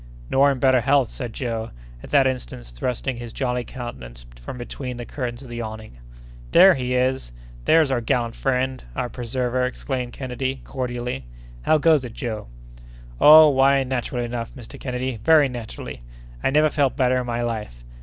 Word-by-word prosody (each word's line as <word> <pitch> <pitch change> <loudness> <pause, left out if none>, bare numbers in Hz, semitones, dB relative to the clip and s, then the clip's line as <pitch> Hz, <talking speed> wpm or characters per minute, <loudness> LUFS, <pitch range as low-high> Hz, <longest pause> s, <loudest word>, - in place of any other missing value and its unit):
"Nor 140 +1 +5
in 135 - -2
better 130 -1 +4
health," 135 -1 +2
said 125 -4 -5
Joe, 115 -2 -3 0.3
at - - -11
that 140 -2 +4
instant 125 - -3
thrusting 120 - -3
his 120 -1 -7
jolly 125 -1 -2
countenance 65 - -8 0.2
from 65 - -7
between 125 +1 -6
the 120 - -6
curtains 125 -1 -5
of 130 - -12
the 120 0 -5
awning. 110 - -8 0.5
"There 190 0 +8
he 125 -3 -2
is! 130 - 0 0.3
there's 160 -3 +4
our 125 -2 +1
gallant 115 0 0
friend—our 130 - -2
preserver!" 125 +1 -2
exclaimed 125 -1 -3
Kennedy, 130 0 -4
cordially.—"How 65 - -3
goes 155 -2 +4
it, 120 -3 -7
Joe?" 110 - -4 0.7
"Oh! 155 +1 +9
why, 135 0 +4
naturally 125 -1 -2
enough, 120 0 -5
Mr. 120 -4 -11
Kennedy, 125 -1 -3
very 155 -3 +6
naturally! 110 - -7 0.4
I - - +3
never 150 +2 +3
felt 140 -3 +1
better 130 -1 +3
in 125 - -4
my 120 0 -1
life! 105 - -5
125 Hz, 165 wpm, -23 LUFS, 115-135 Hz, 0.7 s, Oh